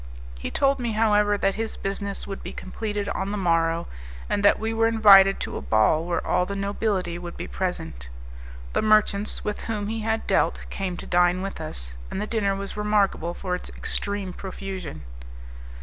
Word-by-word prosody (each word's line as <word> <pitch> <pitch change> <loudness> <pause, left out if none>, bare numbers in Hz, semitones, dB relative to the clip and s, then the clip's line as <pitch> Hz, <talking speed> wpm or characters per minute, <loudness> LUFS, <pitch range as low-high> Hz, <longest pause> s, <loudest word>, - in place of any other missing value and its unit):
He - - -4
told 275 -1 +2
me, 235 -2 -1
however, 210 -1 +3
that 195 0 +1
his 225 +1 -4
business 200 0 -3
would 195 -1 -6
be - - -7
completed 205 +1 -4
on 195 - -2
the 210 - -2
morrow, 165 -2 +1 0.4
and 205 - 0
that 200 - +6
we 220 +1 -1
were 225 0 +3
invited 200 -4 +7
to - - -3
a - - -5
ball 110 +9 +3
where 175 0 -1
all 180 - +1
the 200 - -4
nobility 195 -3 -1
would 175 -1 -8
be - - -4
present. 80 - -4 0.6
The - - +2
merchants 215 -1 +2
with 210 - -3
whom 210 -2 -2
he 225 0 -2
had 220 +1 -1
dealt - - +1
came 185 -3 -3
to - - -7
dine 175 +1 +3
with 195 -4 -5
us, 60 - -5 0.2
and - - -4
the 210 - -1
dinner 210 -3 0
was 195 0 -6
remarkable 205 -5 +1
for 180 -2 -3
its 180 - -4
extreme 200 -2 -3
profusion. 190 - -6
200 Hz, 185 wpm, -25 LUFS, 180-210 Hz, 0.6 s, invited